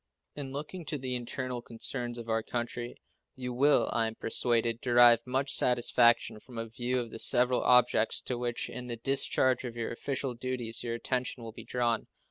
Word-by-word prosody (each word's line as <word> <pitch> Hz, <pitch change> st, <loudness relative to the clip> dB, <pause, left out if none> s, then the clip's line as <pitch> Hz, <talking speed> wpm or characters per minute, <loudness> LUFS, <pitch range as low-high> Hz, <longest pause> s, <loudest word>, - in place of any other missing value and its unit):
In 140 Hz, -2 st, -6 dB
looking 150 Hz, +6 st, -6 dB
to 150 Hz, -, -3 dB
the 130 Hz, -1 st, -4 dB
internal 125 Hz, 0 st, -4 dB
concerns 120 Hz, +1 st, -4 dB
of 115 Hz, -1 st, -8 dB
our 110 Hz, 0 st, 0 dB
country 120 Hz, +1 st, -5 dB, 0.4 s
you 125 Hz, -1 st, -5 dB
will, 140 Hz, +4 st, +3 dB
I 115 Hz, -1 st, +1 dB
am 110 Hz, -, -6 dB
persuaded, 115 Hz, 0 st, +1 dB
derive 120 Hz, -1 st, +6 dB
much 135 Hz, +2 st, 0 dB
satisfaction 120 Hz, -2 st, +3 dB
from 120 Hz, +1 st, -13 dB
a 115 Hz, -, -3 dB
view 125 Hz, +2 st, -2 dB
of 120 Hz, -2 st, -5 dB
the 115 Hz, -, -8 dB
several 125 Hz, 0 st, +3 dB
objects 125 Hz, -3 st, +4 dB
to 125 Hz, -, -3 dB
which, 120 Hz, -1 st, -2 dB
in 125 Hz, 0 st, -7 dB
the 120 Hz, -1 st, -5 dB
discharge 130 Hz, 0 st, +1 dB
of 120 Hz, -2 st, -6 dB
your 115 Hz, -, -3 dB
official 135 Hz, +2 st, -3 dB
duties, 120 Hz, -1 st, -1 dB
your 115 Hz, -1 st, -3 dB
attention 125 Hz, 0 st, -3 dB
will 115 Hz, -, -7 dB
be -, -, -11 dB
drawn. 120 Hz, -2 st, -1 dB
120 Hz, 185 wpm, -30 LUFS, 115-130 Hz, 0.4 s, derive